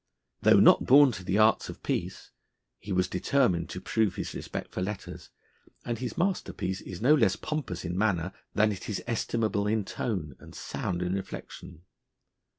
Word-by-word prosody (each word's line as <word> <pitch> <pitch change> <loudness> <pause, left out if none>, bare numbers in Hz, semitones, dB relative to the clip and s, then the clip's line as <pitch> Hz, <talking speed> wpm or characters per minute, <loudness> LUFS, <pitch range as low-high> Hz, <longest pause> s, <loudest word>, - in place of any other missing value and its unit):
Though - - +6
not - - +6
born 140 +1 +7
to 95 -5 -7
the 95 +2 0
arts 110 +1 +3
of - - -9
peace, - - -3 0.5
he 105 - -8
was 90 -1 +2
determined 90 -5 +1
to - - -5
prove 110 -1 0
his - - -4
respect - - -6
for - - -4
letters, 100 +2 -6 0.6
and 120 -1 -3
his 125 -2 -5
masterpiece 170 - -1
is 95 +3 -8
no 140 +5 +6
less 110 -10 +3
pompous 110 - -4
in 85 0 -3
manner 95 -3 0 0.2
than 110 0 +3
it 95 +1 -6
is 105 - -3
estimable 110 -2 -1
in 105 -1 0
tone 85 - -3
and - - -14
sound 90 0 -3
in 90 +1 -1
reflection. 90 -3 -7
100 Hz, 170 wpm, -28 LUFS, 90-115 Hz, 0.6 s, born